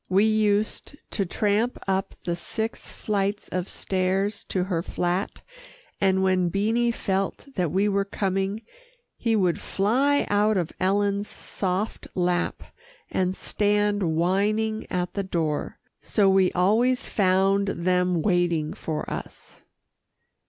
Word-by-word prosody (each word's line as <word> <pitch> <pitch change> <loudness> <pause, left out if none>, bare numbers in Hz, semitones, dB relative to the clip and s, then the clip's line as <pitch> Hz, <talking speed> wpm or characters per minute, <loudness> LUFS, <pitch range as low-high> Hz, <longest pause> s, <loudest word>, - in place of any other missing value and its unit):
We 195 +3 +4
used 215 +4 +1 0.2
to 195 -3 -1
tramp 210 +6 +1
up 190 0 -1
the 175 -1 -1
six 220 +6 -4
flights 205 -1 -2
of 180 0 -3
stairs 195 +2 -1
to 185 - -1
her 180 -3 -1
flat, 180 +2 -2 0.6
and 190 -1 +3
when 185 -2 +2
Beanie 225 +6 +1
felt 195 +1 -2
that 180 -7 0
we 195 +4 +2
were 200 -1 +2
coming, 195 +2 -2 0.5
he 230 -2 0
would 185 -5 +2
fly 260 +9 +2
out 210 +1 +2
of 170 -3 -1
Ellen's 200 +1 +1
soft 190 +2 -3
lap, 180 -1 0 0.5
and 185 0 0
stand 205 0 +1
whining 210 +6 +1
at 180 -1 -2
the 200 - -1
door, 160 -5 -2 0.2
so 205 -3 +2
we 190 -1 +4
always 225 +8 +2
found 195 0 +2
them 180 -2 +1
waiting 175 -5 +1
for 155 -2 -4
us. - - -8
195 Hz, 125 wpm, -25 LUFS, 180-210 Hz, 0.6 s, We